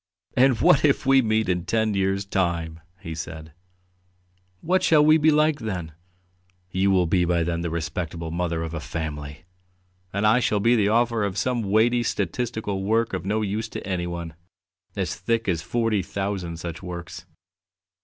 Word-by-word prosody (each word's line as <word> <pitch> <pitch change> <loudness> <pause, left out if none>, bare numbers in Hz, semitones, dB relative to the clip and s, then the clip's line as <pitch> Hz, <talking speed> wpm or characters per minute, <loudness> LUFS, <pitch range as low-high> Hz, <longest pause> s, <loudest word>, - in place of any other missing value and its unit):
"And 130 -2 +4
what 135 - +5
if 150 0 +2
we 135 0 +5
meet 110 -2 +1
in 90 -1 0
ten 110 +1 0
years' 95 0 0
time?" 85 -4 -1 0.2
he 80 -5 -6
said. 80 -1 -7 1.1
"What 185 +2 +1
shall 150 -2 +5
we 155 +1 +6
be 155 +1 +4
like 150 0 +3
then? 90 -7 -4 0.8
You 95 +2 +1
will 95 -2 +3
be 90 +2 +2
by 85 -1 +1
then 85 0 -2
the 85 - -2
respectable 80 0 -4
mother 85 -1 -2
of 80 0 -5
a 80 - -3
family, 75 -1 -6 0.7
and 100 +2 -1
I 110 +4 +5
shall 105 -4 +1
be 115 +4 +4
the 105 -3 +2
author 115 0 +2
of 100 -1 -2
some 125 0 0
weighty 110 +4 +2
statistical 105 -1 -2
work 110 +3 +1
of 95 0 -3
no 110 +2 0
use 105 +2 -2
to - - -7
anyone, 85 -3 -3 0.6
as 95 -5 -2
thick 115 +6 -1
as 85 -4 0
forty 110 +3 0
thousand 95 -3 -4
such 85 -1 -6
works. 85 -2 -8
95 Hz, 170 wpm, -24 LUFS, 85-115 Hz, 1.1 s, we